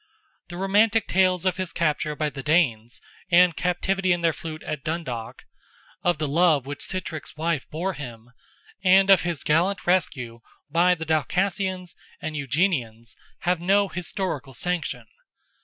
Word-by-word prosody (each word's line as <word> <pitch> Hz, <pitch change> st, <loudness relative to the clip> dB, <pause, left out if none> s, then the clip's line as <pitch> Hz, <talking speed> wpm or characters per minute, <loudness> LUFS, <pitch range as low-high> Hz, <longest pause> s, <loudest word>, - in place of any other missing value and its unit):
The 175 Hz, -, -7 dB
romantic 205 Hz, +3 st, +3 dB
tales 185 Hz, -1 st, +2 dB
of 185 Hz, -2 st, +1 dB
his 185 Hz, -2 st, -3 dB
capture 150 Hz, -2 st, -1 dB
by 150 Hz, 0 st, -1 dB
the 135 Hz, -, -7 dB
Danes, 135 Hz, -7 st, +1 dB, 0.3 s
and 175 Hz, -1 st, +5 dB
captivity 185 Hz, +2 st, 0 dB
in 175 Hz, -1 st, +1 dB
their 165 Hz, -1 st, +2 dB
fleet 155 Hz, 0 st, -7 dB
at 150 Hz, -2 st, -5 dB
Dundalk, 135 Hz, -9 st, -5 dB, 0.6 s
of 175 Hz, -3 st, +1 dB
the 155 Hz, -1 st, -2 dB
love 155 Hz, -2 st, +3 dB
which 145 Hz, +1 st, -6 dB
Sitrick's 170 Hz, -5 st, -5 dB
wife 160 Hz, -3 st, -1 dB
bore 180 Hz, +5 st, -2 dB
him, 120 Hz, -5 st, -9 dB, 0.5 s
and 190 Hz, +1 st, +6 dB
of 190 Hz, -, +7 dB
his 170 Hz, -4 st, -3 dB
gallant 175 Hz, +6 st, +1 dB
rescue 125 Hz, -10 st, 0 dB, 0.3 s
by 175 Hz, +3 st, +4 dB
the 160 Hz, -1 st, -6 dB
Dalcassians 185 Hz, +3 st, -1 dB, 0.3 s
and 155 Hz, -1 st, -5 dB
Eugenians, 130 Hz, -, -1 dB, 0.3 s
have 175 Hz, -1 st, 0 dB
no 200 Hz, +2 st, +3 dB
historical 170 Hz, -, -4 dB
sanction. 150 Hz, -6 st, -3 dB
170 Hz, 145 wpm, -24 LUFS, 145-185 Hz, 0.6 s, of